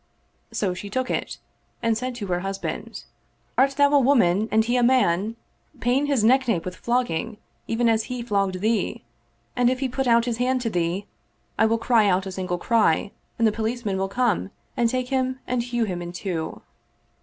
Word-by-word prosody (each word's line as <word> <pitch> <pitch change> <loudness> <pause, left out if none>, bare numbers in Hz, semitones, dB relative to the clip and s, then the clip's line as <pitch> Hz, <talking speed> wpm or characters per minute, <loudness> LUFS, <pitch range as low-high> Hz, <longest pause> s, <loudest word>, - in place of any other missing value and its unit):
So 190 -4 -1
she 200 +3 -7
took 255 +5 -2
it - - -3 0.5
and 230 -1 +2
said 255 +2 -3
to 220 -4 -5
her 175 -2 -1
hus 195 +1 -3
band, - - -6 0.3
" - - -41
Art 270 - +4
thou 285 0 +4
a 290 - +6
woman 225 -6 +3
and 220 0 +3
he 240 +2 0
a 250 - +3
man? 230 -4 +2 0.4
Pain 260 +4 +1
his 275 -7 +1
neck 260 +3 +4
nape 190 -8 0
with 185 0 -5
flogging, 235 -3 -1 0.3
even 235 +1 +1
as 220 -1 +2
he 250 -1 -4
flogged 195 -5 0
thee; 220 +1 0 0.5
and 245 -1 +3
if 255 0 -1
he 270 - 0
put 265 +1 -2
out 235 -1 +4
his 235 -2 -2
hand 255 +1 +1
to 230 -2 -2
thee, 175 +2 -1 0.5
I 220 - +5
will 230 +1 +2
cry 225 -2 +3
out 185 +1 +1
a 190 - -5
single 185 -1 -3
cry 205 -2 +2 0.3
and 230 - +2
the - - +3
po* 225 - -5
licemen 220 -3 -2
will 195 0 -1
come 235 -4 0 0.3
and 235 -1 +2
take 255 0 -2
him 260 -1 0
and 250 -1 0
hew 240 0 -1
him 180 -5 -3
in 175 0 -6
two." 175 -3 -4
230 Hz, 210 wpm, -24 LUFS, 195-250 Hz, 0.5 s, a